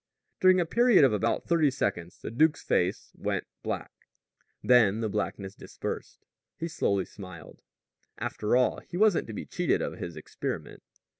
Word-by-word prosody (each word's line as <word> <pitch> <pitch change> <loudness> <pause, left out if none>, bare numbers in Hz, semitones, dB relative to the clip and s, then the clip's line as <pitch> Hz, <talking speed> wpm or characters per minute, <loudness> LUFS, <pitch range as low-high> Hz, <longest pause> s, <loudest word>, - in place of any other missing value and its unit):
During 185 0 +6
a 175 - +2
period 235 -1 +5
of 130 - +5
about 110 +2 0
thirty 165 -4 +4
seconds 95 -9 -2
the - - -4
duke's 155 +6 +2
face 90 +1 0
went - - -2 0.2
black. - - -4 0.7
Then 115 -4 +5
the 110 -1 -1
blackness 100 -1 -3
dispersed. - - -7 0.3
He 165 - -3
slowly 100 - 0
smiled. 90 -5 -11 0.6
After 105 +2 -1
all, 125 0 +3
he 175 - -8
wasn't 210 -2 +3
to 110 - -6
be - - -5
cheated - - 0
of - - -4
his 85 -2 -5
experiment. 75 - -5
115 Hz, 155 wpm, -28 LUFS, 100-160 Hz, 0.7 s, During